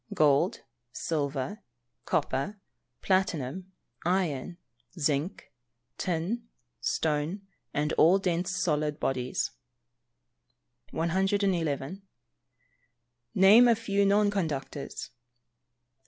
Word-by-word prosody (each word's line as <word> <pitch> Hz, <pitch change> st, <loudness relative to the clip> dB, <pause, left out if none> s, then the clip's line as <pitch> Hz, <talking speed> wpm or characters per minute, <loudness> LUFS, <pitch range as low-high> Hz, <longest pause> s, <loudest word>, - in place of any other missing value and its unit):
_ -, -, -3 dB
Gold, 150 Hz, +4 st, +3 dB, 0.3 s
silver, 145 Hz, +6 st, -2 dB, 0.5 s
copper, 190 Hz, +11 st, -1 dB, 0.4 s
platinum, 185 Hz, -2 st, 0 dB, 0.3 s
iron, 175 Hz, -2 st, 0 dB, 0.4 s
zinc, 145 Hz, +1 st, -1 dB, 0.5 s
tin, 185 Hz, +7 st, -2 dB, 0.3 s
stone, 160 Hz, +5 st, -1 dB, 0.3 s
and 150 Hz, +1 st, 0 dB
all 175 Hz, +5 st, +7 dB
dense 180 Hz, -2 st, -1 dB
solid 150 Hz, -5 st, 0 dB
bodies. 130 Hz, -1 st, -1 dB, 1.4 s
111. 180 Hz, -2 st, 0 dB, 1.3 s
_Name 210 Hz, +6 st, +8 dB
a -, -, +4 dB
few 200 Hz, -2 st, 0 dB
non 205 Hz, +1 st, +4 dB
conductors. 150 Hz, -9 st, -4 dB
170 Hz, 75 wpm, -29 LUFS, 150-195 Hz, 1.4 s, Name